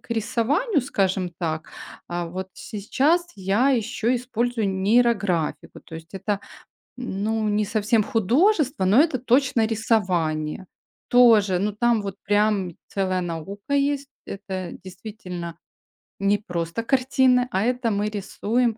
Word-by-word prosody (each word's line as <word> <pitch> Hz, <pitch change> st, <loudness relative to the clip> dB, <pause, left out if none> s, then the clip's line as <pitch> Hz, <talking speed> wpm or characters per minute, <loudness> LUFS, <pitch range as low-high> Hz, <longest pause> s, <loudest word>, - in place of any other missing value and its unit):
к -, -, -24 dB
рисованию, 275 Hz, -, +1 dB
скажем 190 Hz, -7 st, 0 dB
так, 160 Hz, -2 st, -3 dB, 0.4 s
а, 175 Hz, 0 st, -3 dB
вот 185 Hz, +2 st, -6 dB
сейчас 280 Hz, -, 0 dB
я 200 Hz, +7 st, +2 dB
ещё 230 Hz, 0 st, 0 dB
использую 240 Hz, -3 st, -1 dB
нейрографику. 195 Hz, -4 st, +1 dB
То 160 Hz, -, -11 dB
есть 165 Hz, 0 st, -10 dB
это, 195 Hz, +1 st, -2 dB, 0.6 s
ну, 220 Hz, -2 st, -2 dB
не 210 Hz, +1 st, +1 dB
совсем 215 Hz, +2 st, +1 dB
художество, 265 Hz, -, +2 dB
но 205 Hz, +8 st, +5 dB
это, 305 Hz, -5 st, +2 dB
точно, 250 Hz, -2 st, +2 dB
рисование. 180 Hz, -8 st, 0 dB, 0.4 s
Тоже, 220 Hz, -7 st, +5 dB
ну, 210 Hz, +1 st, 0 dB
там 230 Hz, 0 st, +1 dB
вот, 195 Hz, -1 st, -5 dB
прям, 205 Hz, -3 st, +1 dB, 0.2 s
целая 185 Hz, -2 st, -1 dB
наука 180 Hz, -, -5 dB
есть. 280 Hz, 0 st, +1 dB, 0.2 s
Это, 190 Hz, -3 st, -6 dB
действительно, 180 Hz, -3 st, -8 dB, 0.6 s
не 200 Hz, +1 st, +2 dB
просто 175 Hz, +1 st, -3 dB
картины, 255 Hz, -1 st, +3 dB
а, 190 Hz, +2 st, +1 dB
это 245 Hz, -1 st, 0 dB
мы 205 Hz, +1 st, 0 dB
рисуем 220 Hz, +3 st, -1 dB
210 Hz, 125 wpm, -24 LUFS, 190-245 Hz, 0.6 s, но